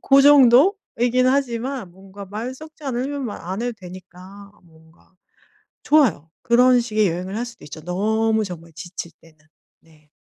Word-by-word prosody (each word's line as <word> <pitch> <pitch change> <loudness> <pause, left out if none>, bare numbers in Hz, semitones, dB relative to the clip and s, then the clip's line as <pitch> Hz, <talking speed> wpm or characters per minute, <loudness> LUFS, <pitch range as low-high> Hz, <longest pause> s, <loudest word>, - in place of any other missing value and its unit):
고 275 0 +5
정도이긴 255 - +4
하지만 255 -5 -1
뭔가 195 +1 -12
말 220 +6 -6
섞지 310 +2 -14
않으면 270 +2 -3
말 210 - -7
안 185 +4 -5
해도 245 +1 -2
되니까 185 +1 -13
뭔가 160 +2 -24 0.7
좋아요. 240 - +2
그런 245 +1 +4
식의 215 -3 0
여행을 180 +4 -4
할 240 - -3
수도 235 - -13
있죠 155 +1 -10
너무 220 +5 0
정말 170 -3 -9
지칠 170 0 -8
때는. 165 -1 -21 0.4
네. 155 -2 -25
215 Hz, 285 characters per minute, -21 LUFS, 180-255 Hz, 0.7 s, 고